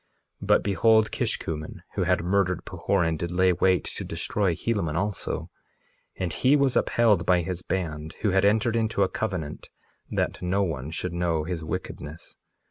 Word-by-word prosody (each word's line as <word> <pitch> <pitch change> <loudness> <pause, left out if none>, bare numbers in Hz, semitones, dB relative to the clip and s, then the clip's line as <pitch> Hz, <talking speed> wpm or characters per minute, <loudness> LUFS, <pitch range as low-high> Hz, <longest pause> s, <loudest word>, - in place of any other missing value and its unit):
2:3 - - -6
But - - +4
behold, 110 +3 +3
Kishkumen, 75 -1 -3
who - - 0
had - - +2
murdered 95 0 +1
Pahoran, 85 -5 0
did 85 +2 -3
lay 90 +1 +3
wait 90 +1 +2
to - - -5
destroy 95 -5 -1
Helaman 95 -7 -1
also; 100 +3 -2 0.6
and 90 -3 -3
he 135 +3 +4
was 140 -3 +2
upheld 110 -7 +3
by 90 -1 +3
his 90 +1 -4
band, 80 -4 -3
who 105 - +2
had 95 +1 +3
entered 110 +3 +3
into 110 -3 +1
a - - +3
covenant 90 -9 -4 0.4
that - - -1
no 95 +3 +1
one 75 -6 -3
should 85 +2 -4
know 85 -2 0
his 85 0 -4
wickedness. 80 +1 -6
90 Hz, 165 wpm, -26 LUFS, 85-100 Hz, 0.6 s, But